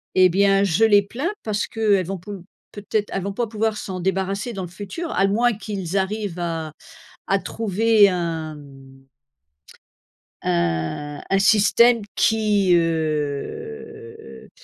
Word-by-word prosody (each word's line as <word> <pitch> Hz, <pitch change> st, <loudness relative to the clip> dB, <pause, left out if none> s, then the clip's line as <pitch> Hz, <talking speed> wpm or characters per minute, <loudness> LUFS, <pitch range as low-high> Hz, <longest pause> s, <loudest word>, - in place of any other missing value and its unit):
et 185 Hz, -1 st, +6 dB
bien, 195 Hz, +2 st, +3 dB
je 200 Hz, +3 st, +3 dB
les 205 Hz, -2 st, +5 dB
plains, 260 Hz, -, -3 dB
parce 210 Hz, -2 st, -2 dB
qu'elles 205 Hz, -5 st, +1 dB
vont 195 Hz, 0 st, -3 dB
pou 185 Hz, 0 st, -9 dB, 0.3 s
peut-être, 210 Hz, 0 st, -3 dB
elles 195 Hz, -, -2 dB
vont 200 Hz, -, -3 dB
pas 235 Hz, +3 st, -2 dB
pouvoir 220 Hz, 0 st, -1 dB
s'en 185 Hz, -3 st, -5 dB
débarrasser 195 Hz, +5 st, -2 dB
dans 195 Hz, -, -5 dB
le 175 Hz, -, -7 dB
futur, 205 Hz, -, -6 dB
à 195 Hz, -, +2 dB
moins 230 Hz, +4 st, +2 dB
qu'ils 200 Hz, -3 st, -4 dB
arrivent 195 Hz, -2 st, -2 dB
à 165 Hz, -2 st, -3 dB, 0.6 s
à 195 Hz, -, +3 dB
trouver 220 Hz, 0 st, +3 dB
un, 165 Hz, -3 st, -3 dB
hem 135 Hz, -2 st, -15 dB, 1.4 s
un 85 Hz, -, -2 dB
un 195 Hz, -, +3 dB
système 225 Hz, +3 st, +4 dB
qui, 210 Hz, -4 st, +2 dB
heu, 170 Hz, -, -3 dB, 0.3 s
heu, -, -, -19 dB
195 Hz, 140 wpm, -22 LUFS, 170-220 Hz, 1.4 s, et